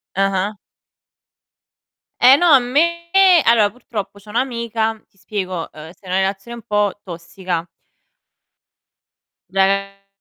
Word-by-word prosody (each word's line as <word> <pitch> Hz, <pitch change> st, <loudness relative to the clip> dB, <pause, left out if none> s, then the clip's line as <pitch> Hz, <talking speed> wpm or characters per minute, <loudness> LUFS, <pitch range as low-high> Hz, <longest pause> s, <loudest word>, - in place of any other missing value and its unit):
Ah-ah. 195 Hz, +1 st, 0 dB, 1.6 s
Eh 260 Hz, +2 st, +8 dB
no, 345 Hz, -1 st, +3 dB
a 275 Hz, -, +9 dB
me 330 Hz, +8 st, 0 dB, 0.4 s
allora 225 Hz, -3 st, +4 dB
purtroppo 205 Hz, -3 st, -7 dB
c'ho 210 Hz, +1 st, -18 dB
un'amica 230 Hz, -2 st, -2 dB
ti 200 Hz, -, -36 dB
spiego, 185 Hz, -3 st, -5 dB
uhm, 155 Hz, +1 st, -11 dB
sta 190 Hz, -, -23 dB
in -, -, -6 dB
una 190 Hz, -, +2 dB
relazione 195 Hz, +5 st, -4 dB
un 230 Hz, -, -12 dB
po' 205 Hz, -1 st, 0 dB
tossica. 170 Hz, 0 st, -5 dB, 1.8 s
De 195 Hz, +1 st, 0 dB
200 Hz, 120 wpm, -19 LUFS, 190-235 Hz, 1.8 s, a